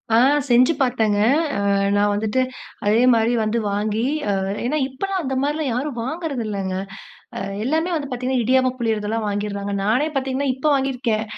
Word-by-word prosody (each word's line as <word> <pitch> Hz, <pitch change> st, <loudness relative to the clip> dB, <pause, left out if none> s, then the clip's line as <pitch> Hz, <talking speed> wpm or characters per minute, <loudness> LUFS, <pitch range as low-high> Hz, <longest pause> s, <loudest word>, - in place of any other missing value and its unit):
ஆ -, -, +6 dB, 0.3 s
செஞ்சு 250 Hz, +4 st, +5 dB
பார்த்தேங்க. 220 Hz, -5 st, +2 dB, 0.5 s
அ 200 Hz, -, +3 dB, 0.2 s
நான் 205 Hz, 0 st, +3 dB
வந்துட்டு 215 Hz, +4 st, 0 dB, 0.5 s
அதேமாரி 230 Hz, +1 st, +4 dB
வந்து 215 Hz, +2 st, 0 dB
வாங்கி, 210 Hz, +2 st, -1 dB, 0.3 s
அ -, -, +2 dB, 0.3 s
ஏன்னா 300 Hz, +5 st, 0 dB
இப்பல்லாம் 370 Hz, +8 st, -3 dB
அந்த 265 Hz, -2 st, -2 dB
மாரிலாம் 295 Hz, 0 st, -1 dB
யாரும் 265 Hz, 0 st, -3 dB
வாங்குறதில்லங்க. 230 Hz, -, -3 dB, 0.6 s
அ -, -, -3 dB, 0.2 s
எல்லாமே 320 Hz, +7 st, 0 dB
வந்து 285 Hz, -2 st, -3 dB
பார்த்தீங்கன்னா, 255 Hz, 0 st, -1 dB
இடியாப்பம் 255 Hz, +1 st, +2 dB
புளிறதெல்லாம் 220 Hz, -1 st, -1 dB
வாங்கிர்றாங்க. 200 Hz, 0 st, -3 dB
நானே 245 Hz, +9 st, +2 dB
பார்த்தீங்கன்னா, 270 Hz, +1 st, -1 dB
இப்ப 265 Hz, +4 st, -4 dB
வாங்கியிருக்கேன். 250 Hz, -5 st, 0 dB
245 Hz, 140 wpm, -21 LUFS, 215-270 Hz, 0.6 s, ஆ